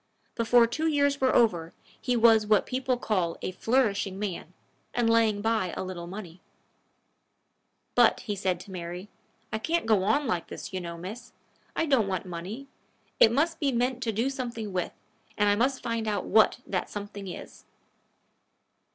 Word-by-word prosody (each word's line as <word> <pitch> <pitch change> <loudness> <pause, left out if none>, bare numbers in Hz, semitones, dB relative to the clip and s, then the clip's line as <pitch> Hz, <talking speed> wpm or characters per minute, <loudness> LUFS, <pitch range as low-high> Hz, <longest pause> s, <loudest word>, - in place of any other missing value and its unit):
Before 235 +1 +4
two 310 +8 -1
years 285 -2 +2
were 260 -1 +3
over, 175 -8 +2 0.3
he 250 - 0
was 225 -2 +5
what 210 -1 +4
people 255 0 -1
call 185 -8 -1
a - - -2
flourishing 205 -3 +1
man, 195 -4 -4 0.4
and 240 -1 +2
laying 225 -3 +3
by 220 -6 0
a - - -2
little 180 -2 -6
money. 180 -2 -9 1.5
"But," - - +4
he 205 -3 -3
said 185 -2 -1
to 195 - -12
Mary, 180 +2 -6 0.4
"I 220 - 0
can't 330 +7 0
go 215 -4 +3
on 225 +9 +2
like 180 -8 -1
this, - - -8
you 185 - -2
know, 170 -1 -6
miss. 210 +8 -8 0.4
I 325 - +1
don't 265 -9 +3
want 190 -1 -2
money. 185 +9 -6 0.5
It 225 - +7
must 315 +7 +1
be 285 -3 +1
meant 250 +1 0
to 230 - 0
do 230 +6 0
something 235 -6 -5
with, 180 -1 -1 0.5
and 205 - +3
I 205 - +4
must 260 +5 0
find 230 -1 -2
out 210 -1 -1
what 220 -1 +4
that 185 -2 -2
something 205 -1 -7
is." 180 - -9
220 Hz, 170 wpm, -28 LUFS, 185-245 Hz, 1.5 s, It